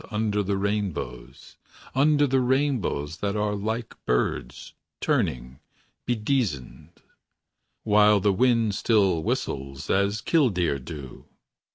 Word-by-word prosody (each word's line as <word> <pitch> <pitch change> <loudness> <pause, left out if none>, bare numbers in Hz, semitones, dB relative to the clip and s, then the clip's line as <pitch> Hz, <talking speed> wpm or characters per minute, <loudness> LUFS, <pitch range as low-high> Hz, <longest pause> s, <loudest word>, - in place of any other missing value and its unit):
Under 105 -1 0
the 100 0 -1
rainbows; 95 - -4 0.4
Under 145 +2 +4
the 135 -1 +2
rainbows 125 - 0
That 100 +1 -2
are 105 0 0
like 110 +3 -3
birds. - - -2 0.3
Turning, 65 +1 -1 0.5
bedizened. 110 - -2 0.8
While 105 -1 +5
the 100 +1 +2
wind 115 -1 +2
still 95 -6 +2
whistles 70 -2 -3
As 100 +2 +1
kildeer 95 - +1
do. 70 -2 -9
105 Hz, 100 wpm, -25 LUFS, 80-115 Hz, 0.8 s, While